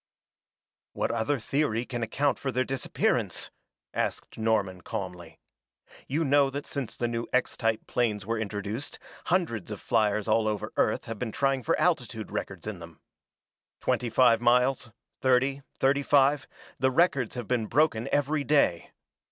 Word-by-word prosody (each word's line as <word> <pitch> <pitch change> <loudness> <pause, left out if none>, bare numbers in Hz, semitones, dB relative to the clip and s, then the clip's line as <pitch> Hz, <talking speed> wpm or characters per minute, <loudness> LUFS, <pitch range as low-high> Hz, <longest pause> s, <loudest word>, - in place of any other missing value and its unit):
"What - - -1
other 115 +5 0
theory 120 -1 0
can 120 -2 -4
account 140 +6 0
for 135 - -2
their 130 0 +1
disappearance?" 135 0 -1 0.4
asked - - -3
Norman 105 -5 0
calmly. 90 -1 -6 0.7
"You 155 +4 0
know 140 0 +4
that 145 +2 -5
since 140 -5 -4
the 120 - 0
new 115 0 -3
X 125 - +1
type 115 -2 0
planes 105 -5 0
were 115 +1 -1
introduced, 105 +4 -4 0.3
hundreds 165 - 0
of 105 - -5
fliers 105 -2 +1
all 110 0 +3
over 105 -2 -2
Earth - - +1
have 115 -2 -6
been 120 -3 -3
trying 135 +2 +1
for - - 0
altitude - - 0
records - - -5
in 105 -4 -5
them. 85 -1 -12 0.8
Twenty 120 - 0
five 115 0 +4
miles 125 +1 +3 0.3
thirty 130 +2 +2 0.2
thirty 140 +1 +3
five 140 0 +3 0.3
the 130 - +3
records 135 -5 +2
have 120 -4 -5
been 120 -3 0
broken 120 -4 +2
every 145 +1 +1
day. 140 - +2
120 Hz, 150 wpm, -28 LUFS, 110-135 Hz, 0.8 s, know